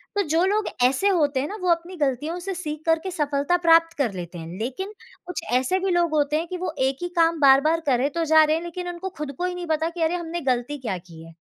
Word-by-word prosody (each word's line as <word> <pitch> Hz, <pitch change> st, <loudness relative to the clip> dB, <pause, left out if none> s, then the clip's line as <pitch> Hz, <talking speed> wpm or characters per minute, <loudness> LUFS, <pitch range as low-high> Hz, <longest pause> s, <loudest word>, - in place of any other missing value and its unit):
तो 405 Hz, -, +3 dB
जो 325 Hz, +4 st, +2 dB
लोग 415 Hz, +2 st, +1 dB, 0.2 s
ऐसे 265 Hz, +10 st, +3 dB
होते 295 Hz, -7 st, +2 dB
हैं 285 Hz, -, -1 dB
ना 420 Hz, -, -6 dB
वो 365 Hz, -, 0 dB
अपनी 340 Hz, +2 st, 0 dB
गलतियों 295 Hz, +4 st, -1 dB
से 385 Hz, +2 st, -4 dB
सीख 305 Hz, -3 st, -5 dB
करके 325 Hz, +3 st, +1 dB
सफलता 295 Hz, +1 st, 0 dB
प्राप्त 330 Hz, 0 st, +5 dB
कर 240 Hz, -8 st, 0 dB
लेते 175 Hz, -1 st, -7 dB
हैं। 165 Hz, 0 st, -7 dB
लेकिन 380 Hz, -, -4 dB, 0.3 s
कुछ 360 Hz, -, -4 dB
ऐसे 260 Hz, +9 st, +2 dB
भी 380 Hz, 0 st, -1 dB
लोग 345 Hz, -2 st, +2 dB
होते 295 Hz, 0 st, +2 dB
हैं 335 Hz, +2 st, -3 dB
कि 365 Hz, -, -5 dB
वो 355 Hz, -3 st, -3 dB
एक 270 Hz, 0 st, -2 dB
ही 350 Hz, -, -2 dB
काम 330 Hz, -1 st, +3 dB
बार-बार 280 Hz, +4 st, +5 dB
करे 260 Hz, +3 st, +2 dB
तो 335 Hz, +3 st, -2 dB
जा 315 Hz, 0 st, +6 dB
रहे 310 Hz, +1 st, +2 dB
हैं 330 Hz, -, -3 dB
लेकिन 355 Hz, +1 st, -5 dB
उनको 350 Hz, +2 st, -5 dB
खुद 300 Hz, -2 st, -4 dB
को 360 Hz, -, -1 dB
ही 360 Hz, 0 st, -2 dB
नहीं 350 Hz, -1 st, -6 dB
पता 320 Hz, +1 st, 0 dB
कि 340 Hz, 0 st, -7 dB
अरे 330 Hz, +2 st, +1 dB
हमने 340 Hz, 0 st, -4 dB
गलती 255 Hz, +2 st, -1 dB
क्या 220 Hz, -8 st, -3 dB
की 170 Hz, -2 st, -13 dB
है 165 Hz, 0 st, -13 dB
320 Hz, 260 wpm, -24 LUFS, 275-350 Hz, 0.3 s, जा